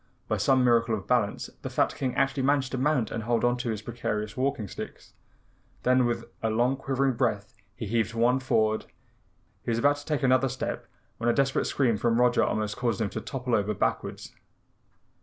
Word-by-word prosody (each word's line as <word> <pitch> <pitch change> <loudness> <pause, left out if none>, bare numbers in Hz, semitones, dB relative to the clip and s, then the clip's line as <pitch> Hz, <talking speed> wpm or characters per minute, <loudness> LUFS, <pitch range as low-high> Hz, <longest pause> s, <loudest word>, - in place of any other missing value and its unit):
By - - 0
some 130 -1 +3
miracle 115 -2 +3
of 100 - -6
balance 110 -5 0
the - - -4
fat - - +1
King 130 -3 -2
actually 135 0 +1
managed 135 0 +1
to 130 - -2
mount 130 -5 +1
and 115 - -3
hold 115 +1 +1
on 120 0 +3
to 120 -1 -3
his 105 -2 -3
perilous 105 -2 -3
walking 130 -4 -1
sticks. - - -9 0.7
Then 125 0 +4
with 115 -1 -2 0.2
a 110 - 0
long 120 +4 +2
quivering 135 0 0
breath 115 -4 -1 0.2
he 110 - -5
heaved 115 +1 0
one 120 +3 +3
forward. 110 -4 +1 0.8
He - - -5
was 115 - +1
about 145 +4 +3
to 145 - -11
take 150 -2 -1
another 130 0 +4
step 130 +1 -4 0.3
when 115 +1 +1
a - - +4
desperate 135 +1 +1
scream 120 -6 +1
from 115 +2 +1
Roger 125 0 +4
almost 105 -1 -1
caused 120 -4 0
him 105 -3 -1
to - - -4
topple 125 -2 -4
over 105 -1 +1
backwards. - - -2
120 Hz, 195 wpm, -27 LUFS, 110-130 Hz, 0.8 s, Then